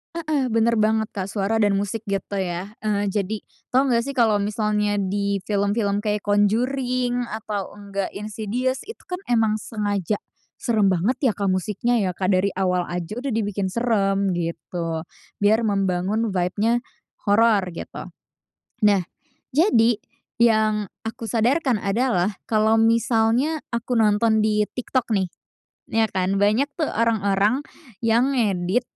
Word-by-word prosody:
Heeh, 305 -5 0
benar 230 0 +2
banget, 220 0 +2
Kak. 190 -3 -4
Suara 205 +2 -1
dan 205 -2 +3
musik 205 +3 -2
gitu 200 0 -2
ya. 180 +2 -3
Eee, 205 -1 0
jadi 205 +1 -2 0.3
tahu 265 +1 +3
nggak 235 -1 +2
sih 275 - -4
kalau 220 -5 +3
misalnya 210 0 0
di 200 0 -1
film-film 205 0 0
kayak 210 -1 -1
Conjuring 245 +4 +1
atau 210 -3 -5
nggak, 200 -1 -5
Insidious, 220 +5 -2
itu 450 - -10
kan 360 0 -5
emang 225 -3 +2
sengaja 205 -3 -2 0.4
seram 215 -5 +2
banget 190 - 0
ya, 255 -6 +3
Kak, 200 -1 0
musiknya 210 +6 0
ya, 185 -2 0
Kak. 185 +1 0
Dari 185 +2 +2
awal 180 -2 +1
aja 180 +6 -4
udah 275 +2 -3
dibikin 205 -4 -1
seram 200 -3 +1
gitu. 165 -1 -3 0.3
Biar 215 +3 +3
membangun 195 +2 0
vibe-nya 205 +6 +1 0.5
horor 210 0 +5
gitu. - - -7 0.8
Nah, 200 -2 +5 0.5
jadi 240 - +4 0.4
yang 215 -2 +3 0.2
aku 225 +1 -5
sadarkan 245 +5 +2
adalah, 200 -2 +1 0.2
kalau 220 0 +3
misalnya 230 +6 +2
aku 235 +1 -1
nonton 220 +1 +3
di 210 0 +2
TikTok 250 +2 -3
nih, 190 -3 +1 0.6
ya 225 0 +3
kan, 190 +1 0
banyak 215 +8 +3
tuh 310 - +1
orang-orang 215 +1 +1 0.4
yang 235 +4 +3
ngedit, 200 -3 +1
215 Hz, 135 wpm, -23 LUFS, 200-235 Hz, 0.8 s, horor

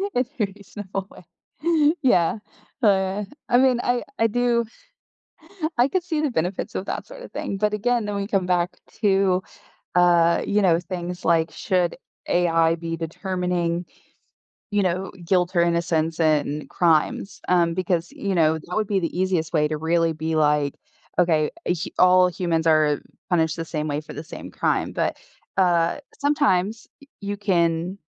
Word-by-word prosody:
In 250 - +2
a 210 - +3
reasonable 195 -1 -7
way. - - -15 0.8
Yeah, 210 - +3 0.4
oh - - +6
yeah. 190 +1 +1 0.3
I 245 - +5
mean, 255 -2 +4
I 245 0 +1 0.2
I 225 - +4
do 235 0 +1 1.1
I 245 +2 +5
could 365 +3 -1
see 320 -4 -1
the 295 -4 0
benefits 180 0 -2
of 190 - -3
that - - -4
sorta - - -10
thing, 195 - -4
but 210 +1 +1
again, 235 +1 +1
then 205 -1 -3
we 200 0 -2
come 195 -4 0
back 180 -1 +1 0.3
to, 195 -2 +3 0.5
uh, 170 -1 +4
you 210 +1 +2
know, 170 -4 +4
things 180 0 -6
like, 165 -1 +2
"Should 180 -3 0 0.3
AI 165 -2 +3
be 165 0 -5
determining, 175 0 -2 0.9
you 205 -1 +2
know, 185 +1 -1
guilt 180 +1 +1
or - - +5
innocence 165 -1 0
in 150 -1 +1
crimes?" 170 +3 +1
Um, 170 -2 +3
because, 175 -2 -1
you 200 -2 -3
know, 160 -1 +3
that 180 +5 -7
would 215 -2 0
be 200 -2 +1
the 170 0 -3
easiest 180 -3 0
way 150 -2 +2
to 155 - -2
really 165 +1 +1
be 160 +1 -2
like, 150 -2 +2 0.4
"Okay, 160 -4 +3 0.2
eh, 175 - +2
h 170 - -4
all 180 0 +6
humans 170 -2 -1
are 155 -2 +3 0.3
punished 160 -2 +2
the 165 - -3
same 155 -1 -3
way 145 +1 -1
for - - -10
the 150 - -7
same - - -9
crime," - - 0
but, - - -1 0.4
uh, 175 +3 +3 0.2
sometimes 230 -8 +1 0.2
y - - -15
you 200 0 -3
can 180 -2 0
180 Hz, 165 wpm, -23 LUFS, 165-200 Hz, 1.1 s, oh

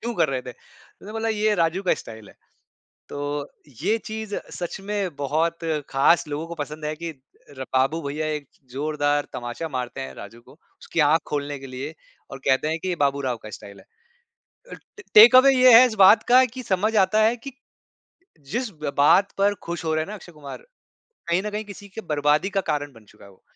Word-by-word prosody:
कर - - +2
रहे 130 -2 -2
थे, 125 - -8
उसने 200 - -17
बोला 225 +1 -2
ये 215 0 +1
राजू 170 +1 0
का 185 - +3
स्टाइल 110 -2 -10
है। - - -19 0.7
तो 145 0 -4 0.3
ये 215 +5 +2
चीज़ 220 -1 -6 0.2
सच 175 +1 -5
में 195 -4 -3
बहुत 155 +4 -1 0.3
ख़ास 155 +5 +3
लोगों 150 +3 -4
को 170 - -7
पसंद 150 +1 -8
है 150 - -2
कि 170 0 -6 0.6
बाबू 135 +5 +2
भैया 150 +2 -3
एक 150 -3 -5 0.2
ज़ोरदार 145 +1 -1
तमाचा 120 +7 -5
मारते 125 -3 -5
हैं 65 0 -7
राजू 115 - -11
को, - - -19 0.3
उसकी 165 - -2
आँख 160 +1 +4
खोलने 145 -1 -3
के 135 - -10
लिए 135 +4 -7 0.4
और 135 - -8
कहते 135 +3 +2
हैं 160 - -1
कि 185 - -3
ये 180 - -1
बाबू 140 -1 +1
राव 130 -3 -2
का 110 - -9
स्टाइल 100 -1 -11
है। - - -20 0.9
अ, - - -6 0.4
टेक 230 +4 +9
अवे 270 +1 +7
ये 255 -1 +7
है 255 - +8
इस 225 - -5
बात 215 +4 +7
का 255 +1 +7
कि 255 +1 -8
समझ 210 +2 0
आता 215 +4 +1
है 225 +2 +3
कि 275 +4 -9 1.0
जिस 240 0 -2 0.3
बात 185 +7 +4
पर 205 +1 +3
खुश 170 0 -5
हो 160 - 0
रहे 155 - 0
हैं 160 - -7
ना 210 - -6
अक्षय 180 -4 -12
कुमार 145 -2 -10 0.7
कहीं 175 +2 +1
न - - -2
कहीं 210 +1 -4
किसी 205 0 -11
के 200 +3 -8
बर्बादी 150 +5 +1
का - - +4
कारण 145 -1 -2
बन 115 -3 -18
चुका 105 - -19
है 100 - -15
वो। 95 - -23
160 Hz, 205 wpm, -23 LUFS, 140-205 Hz, 1.0 s, टेक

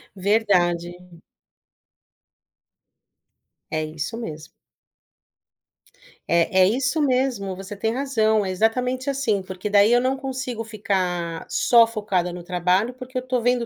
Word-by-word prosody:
Verdade. 180 -4 +1 2.7
É 155 0 -1
isso 155 +8 -5
mesmo. 160 -8 -7 1.8
Eh, 170 0 +3
é 185 0 +5
isso 265 +7 0
mesmo, 250 -8 0
você 195 +2 -8
tem 220 +3 -2
razão, 220 -6 +1
é 190 - -2
exatamente 250 +6 0
assim, 235 -8 0
porque 185 +2 -6
daí 205 +3 +5
eu 245 - +4
não 260 +1 0
consigo 260 -4 -4
ficar 185 -6 -2
só 235 -2 +5
focada 195 -6 -2
no 175 -1 -8
trabalho, 185 +6 0
porque 255 0 -8
eu - - 0
estou 255 -2 -1
vendo 245 0 +1
215 Hz, 125 wpm, -23 LUFS, 185-250 Hz, 2.7 s, é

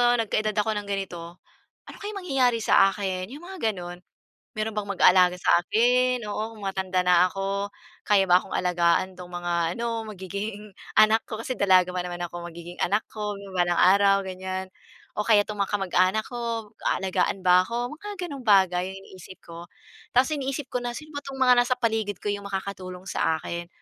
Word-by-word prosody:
nagka-edad 230 -3 +2
ako 210 +1 +1
ng 205 - -11
ganito, 175 -4 -5 0.5
ano - - -10
kaya 410 +1 -5
mangyayari 265 -11 +1
sa 195 - +6
akin? 190 -2 -3
Yung 290 - -9
mga 355 - -2
ganon, 175 -1 -9 0.5
meron 215 0 -2
bang 205 -1 -4
mag-aalaga 180 -1 +5
sa 175 0 +3
akin, 245 +4 +2
oo, 215 +2 -4
kung - - -13
matanda 190 -1 -1
na 180 0 +5
ako? 195 +1 -3 0.3
Kaya 200 -2 +3
ba 180 0 +5
akong - - -14
alagaan 180 +1 +1
'tong 180 -1 -11
mga 175 0 -3 0.2
ano 230 -1 -2
magiging 200 +1 -6 0.2
anak 215 +1 +6
ko, 220 - -4
kasi 230 +3 -4
dalaga 185 -4 +3
pa 180 - -1
naman 175 0 -6
ako, 175 0 -7
magiging 170 +1 -10
anak 205 +4 +1
ko 210 -1 -4 0.2
balang 175 -1 +1
araw, 195 +1 +5
ganyan, 185 0 -5 0.5
o 210 - -1
kaya 210 -2 +4
'tong 210 - -5
mga 200 - 0
kamag-anak 195 +1 +1
ko 235 -2 -4 0.2
aalagaan 190 0 0
ba 180 0 +6
ako? 240 +7 -4
Mga 415 +6 -8 0.2
gano'ng 280 -5 -8
bagay 190 -3 +4
yung 195 - -9
iniisip 185 0 -13
ko. 170 +1 -10 0.4
Tapos 260 +5 +3
iniisip 275 0 -3
ko 250 -1 -2
na, 240 - -2
sino 305 +4 -10
ba 285 - -4
'tong 270 -1 -8
mga 255 -1 +6
nasa 255 +1 0
paligid 220 -4 -1
ko - - -6
yung 205 0 -2
makakatulong 190 -2 -6
sa 160 -4 0
akin? 170 +1 -5
200 Hz, 185 wpm, -25 LUFS, 180-230 Hz, 0.5 s, sa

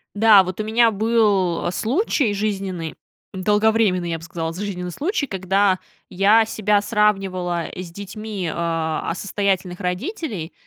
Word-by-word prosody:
Да, 210 -2 +7
вот 185 +2 -6
у - - 0
меня 225 +1 +3
был 200 -6 +1
случай 255 - 0
жизненный, 195 -5 -3 0.4
долговременный, 210 -2 +2
я 165 - -1
б 165 - -14
сказала, 165 -1 -4
с 170 - -9
жизненный 180 -3 -4
случай, 295 - -2
когда 190 0 +1 0.3
я 210 +4 +4
себя 210 -2 +1
сравнивала 195 -5 0
с 180 -2 -7
детьми, 200 -1 -5
а, 165 -2 -2
а, - - -3
состоятельных 190 -2 -1
родителей. 190 - -4
195 Hz, 135 wpm, -21 LUFS, 180-215 Hz, 0.4 s, Да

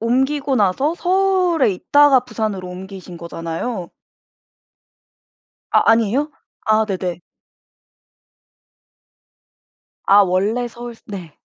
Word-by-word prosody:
옮기고 265 +4 0
나서 215 - +1
서울에 365 - +2
있다가 285 +6 +4
부산으로 215 -6 -4
옮기신 185 -1 -9
거잖아요. 170 +4 -5 1.8
아 - - +4
아니에요? 230 +7 +2 0.4
아 220 0 +3
네네. 180 -4 -4 2.8
아 200 +1 +5
원래 205 +6 0
서울스 235 0 -10
네. 180 -7 -9
220 Hz, 195 characters per minute, -19 LUFS, 185-265 Hz, 2.8 s, 아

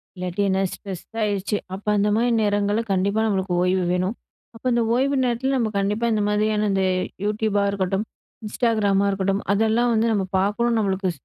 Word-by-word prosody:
இல்லாட்டி 185 +2 -3
என்ன 190 0 +1
ஸ்ட்ரெஸ் 190 -4 -8 0.2
ஆயிடுச்சு, 205 0 -1 0.2
அப்போ 200 +2 -8
அந்த 205 +1 +2
மாதிரி 240 +2 +2
நேரங்களில 205 +1 +1
கண்டிப்பா 200 +3 +1
நம்மளுக்கு 190 -3 -1
ஓய்வு 180 0 +1
வேணும். 185 +4 0 0.4
அப்போ 225 - -15
இந்த 235 - +2
ஓய்வு 275 +2 +1
நேரத்தில 250 +2 0
நம்ம 225 -3 0
கண்டிப்பா 210 +4 0
இந்த 215 - +1
மாதிரியான, 210 0 +1
இந்த 195 0 +1 0.4
யூடியூபா 210 -1 0
இருக்கட்டும், 195 +2 -1 0.4
இன்ஸ்டாகிராமா 210 -3 +1
இருக்கட்டும், 195 +1 -1
அதெல்லாம் 225 +3 +2
வந்து 225 +1 +2
நம்ம 200 -3 0
பார்க்கணும். 230 +4 +1
நம்மளுக்கு 190 -2 0
205 Hz, 160 wpm, -23 LUFS, 195-220 Hz, 0.4 s, அந்த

